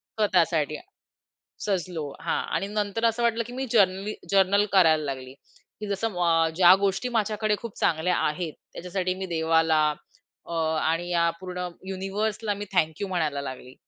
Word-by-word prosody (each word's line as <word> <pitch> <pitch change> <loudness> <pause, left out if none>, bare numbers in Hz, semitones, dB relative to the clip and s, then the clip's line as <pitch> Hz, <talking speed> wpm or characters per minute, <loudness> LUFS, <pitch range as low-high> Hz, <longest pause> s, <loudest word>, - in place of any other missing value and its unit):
स्वतःसाठी, 170 -7 +2 0.9
सजलो 180 -5 -2 0.2
हां 165 - -1
आणि 195 - -1
नंतर 210 +2 -1
असं 230 +1 +1
वाटलं, 230 0 +2
की 245 - -9
मी 265 +1 -3
जेनरली 200 -1 +2 0.2
जर्नल 200 +1 +4
करायला 160 -5 +5
लागली, 130 -2 -5 0.5
की 210 - -5
जसं 200 +3 -1
म 180 - -6
अ, 165 -1 +3
ज्या 180 +1 +8
गोष्टी 200 +6 -1
माझ्याकडे 215 0 0
खूप 235 -3 -7
चांगल्या 165 +3 +1
आहेत, 155 +1 -1 0.2
त्याच्यासाठी 185 +1 -2
मी 190 - -4
देवाला, 160 -1 +3 0.6
अ, 170 - -7 0.3
आणि 165 +2 0
या 170 -1 +3
पूर्ण 180 -1 -5 0.2
युनिव्हर्सला 205 +3 -2
मी 205 +1 -6
थँक 160 -2 +1
यू 200 - -1
म्हणायला 160 -6 -1
लागली. 130 -2 -8
185 Hz, 155 wpm, -26 LUFS, 165-205 Hz, 0.9 s, ज्या